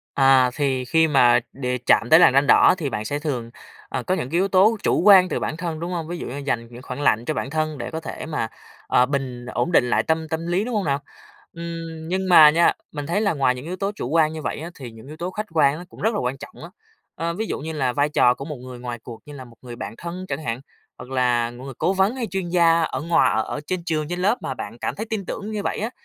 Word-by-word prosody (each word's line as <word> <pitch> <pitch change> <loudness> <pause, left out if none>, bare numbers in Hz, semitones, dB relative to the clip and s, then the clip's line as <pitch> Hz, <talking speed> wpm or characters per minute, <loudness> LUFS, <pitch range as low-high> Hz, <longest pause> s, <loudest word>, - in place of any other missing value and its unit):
À, 135 -2 +5
thì 135 -3 0
khi 160 +5 +3
mà 125 -6 +5
đề 125 -1 -2
chạm 120 - +3
tới 160 - +8
làn 175 - +6
ranh 140 +1 +3
đỏ, - - +6
thì 155 -6 -3
bạn 105 -4 -4
sẽ 145 +6 -2
thường, 130 -6 -3 0.4
ờ, - - -3
có 185 - 0
những 130 - -4
cái - - -12
yếu 190 +2 +2
tố 195 +4 +4
chủ - - +2
quan 190 -1 +7
từ - - -1
bản 155 - -3
thân, 165 -2 -4
đúng 170 +2 -4
không? 165 -3 -3
Ví 175 +1 -5
dụ - - -6
như 130 - -6
dành 130 -5 -2
những 120 +1 -10
khoảng 125 +2 -6
lạnh 115 -4 +2
cho 155 - -1
bản 130 -2 -3
thân 155 0 -2
để 120 - -6
có 160 - -3
thể 160 - -7
mà, 155 -8 -2 0.4
ờ, 125 - +4
bình 130 -3 -4
ổn 125 +6 -2
định 125 -7 +3
lại 110 -1 +2
tâm 160 +2 -1
tâm 160 +2 -3
lý, 175 +3 +1
đúng 245 -1 -3
không 205 - 0
nào? 140 -1 0 0.5
Ừm, 165 -1 -7
nhưng 190 +1 -1
mà 155 -4 +9
nha, 170 +3 +4 0.2
mình 145 -1 -5
thấy 175 +6 0
là 205 -2 +2
ngoài 135 -4 +1
những 125 +1 -8
yếu 175 +3 -5
tố 195 +2 -2
chủ 205 - -5
quan 155 +1 +2
như 160 -1 -6
vậy 135 - -3
á, 165 +2 -6
thì 130 -5 -9
những 115 +2 -14
yếu 150 +2 -10
tố 175 +3 -4
khách 215 +3 -5
quan 145 -2 +3
á 175 - -9
cũng - - -15
rất 220 +2 +1
là - - -1
quan 125 +1 -2
trọng - - -11
á. 170 - -10 0.4
Ơ, 170 0 -3
ví 220 +5 -3
dụ - - -3
như 160 +3 -5
là 135 -5 0
vai 145 +4 +1
trò 125 -4 +4
của 135 - -8
một 150 0 -6
người 125 0 -10
ngoài 120 -1 -6
cuộc 115 -1 -10
như 145 - -10
là 130 -2 -9
một 120 -2 -17
người 120 -2 -9
bạn 110 - -6
thân 175 +2 -6
chẳng 140 +3 -3
hạn, 115 +1 -3 0.4
hoặc 125 - -10
là 125 -2 +1
người 130 +3 -9
cố 185 - +1
vấn, 195 +5 +1
hay 245 -3 -2
chuyên 190 -1 -3
gia 170 -1 +4
ở - - -2
ngoà 170 +1 +3
ở 110 - +1
ở 145 - -5
trên 185 0 -3
trường, 155 -3 -2
trên 175 +1 -3
lớp 205 +6 +1
mà 135 - -3
bạn 115 -1 -7
cảm - - -3
thấy 220 - -5
tin 210 -4 -3
tưởng 210 - -5
như 210 -1 -3
vậy - - -2
á, 220 +3 -2
155 Hz, 290 wpm, -22 LUFS, 125-175 Hz, 0.5 s, mà